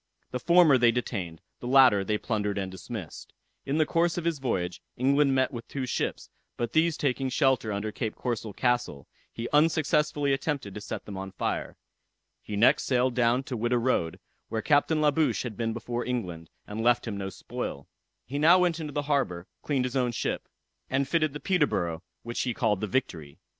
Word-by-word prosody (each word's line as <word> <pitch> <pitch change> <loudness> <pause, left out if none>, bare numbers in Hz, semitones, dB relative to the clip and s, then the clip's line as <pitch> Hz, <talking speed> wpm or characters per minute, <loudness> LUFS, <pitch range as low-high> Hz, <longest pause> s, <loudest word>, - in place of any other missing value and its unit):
The 125 - -2
former 170 -2 +5
they 120 -1 +5
detained, 95 -9 -4 0.2
the 120 - -6
latter 130 -6 +6
they 105 +2 0
plundered 105 -3 -2
and 95 -1 -3
dismissed. 95 -2 -8 0.3
In 140 +2 0
the 155 - +4
course 170 +2 +1
of 170 - -3
his 165 -4 0
voyage, 90 -9 -2 0.2
England 140 +2 +3
met 130 +1 +2
with 120 -1 -7
two 135 -2 -3
ships, 125 - -2 0.3
but 120 -1 -3
these 160 0 +3
taking 135 -1 0
shelter 130 -4 +2
under 105 +1 -2
Cape 110 0 -3
Corso 115 -3 -3
Castle, 120 - -1 0.2
he 115 +1 -5
unsuccessfully 150 -2 +2
attempted 135 -7 -2
to 105 - -7
set - - -6
them 100 -2 -7
on 95 0 -6
fire. 95 - -3 0.6
He 105 - -6
next 105 +4 +4
sailed 125 -1 +2
down 120 +1 +2
to 135 - -5
Whydah 120 +2 +1
road, 115 -9 0 0.3
where 110 -1 -2
Captain 155 +1 +3
La 150 -1 +4
Bouche 140 - +1
had 120 -4 -5
been 115 0 -1
before 120 +1 -3
England, 90 -10 -4 0.2
and 105 +2 -5
left 120 +1 +3
him 110 - -3
no 95 -1 -3
spoil. 70 -6 -6 0.4
He 140 +2 -4
now 165 +4 +7
went 175 -2 +2
into 150 -2 -5
the 145 - -1
harbor, 135 -13 0 0.2
cleaned 135 -4 0
his 125 +1 -4
own 125 -2 +1
ship, - - -3 0.4
and 135 +1 +1
fitted 155 +1 +2
up - - -18
the 150 - -5
Peterborough, 130 - 0 0.2
which 120 0 -3
he 125 -3 -1
called 105 -5 +1
the 105 - -1
Victory. 85 - -3
125 Hz, 195 wpm, -28 LUFS, 105-145 Hz, 0.6 s, now